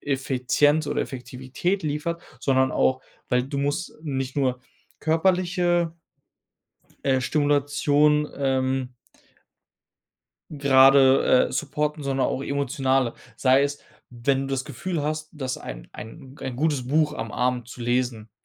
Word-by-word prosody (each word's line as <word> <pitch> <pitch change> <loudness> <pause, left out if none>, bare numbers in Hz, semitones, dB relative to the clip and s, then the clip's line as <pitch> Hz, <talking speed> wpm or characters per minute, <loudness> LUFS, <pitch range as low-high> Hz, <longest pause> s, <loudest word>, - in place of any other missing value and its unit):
Effizienz 145 +2 +1
oder - - -1
Effektivität 135 +8 -3
liefert, 155 +3 -2 0.2
sondern 130 -1 +2
auch, 130 0 +1 0.3
weil 125 -1 +2
du 140 +2 -5
musst 145 +5 -2
nicht 135 -3 -3
nur 130 -2 0 0.4
körperliche 175 0 +1 1.1
äh, 130 -1 +2
Stimulation, 145 +1 +2
ähm 130 -1 0 1.6
grade, 135 -2 +5
äh, - - -10
supporten, 150 +1 -2
sondern 135 -1 0
auch 135 - -2
emotionale, 135 -3 0 0.2
sei 130 +1 +4
es, 145 0 -2 0.3
wenn 130 +3 0
du 135 - -4
das 135 -1 -2
Gefühl 155 +4 -4
hast, 155 +1 -3
dass 130 -4 -4
ein - - -9
ein 135 +3 -10
g - - -13
ein 130 -2 -4
gutes 145 -3 0
Buch 150 +1 +2
am 115 -7 -5
Abend 125 -1 -1
zu 125 - -10
lesen 120 -2 -1
135 Hz, 125 wpm, -24 LUFS, 130-150 Hz, 1.6 s, grade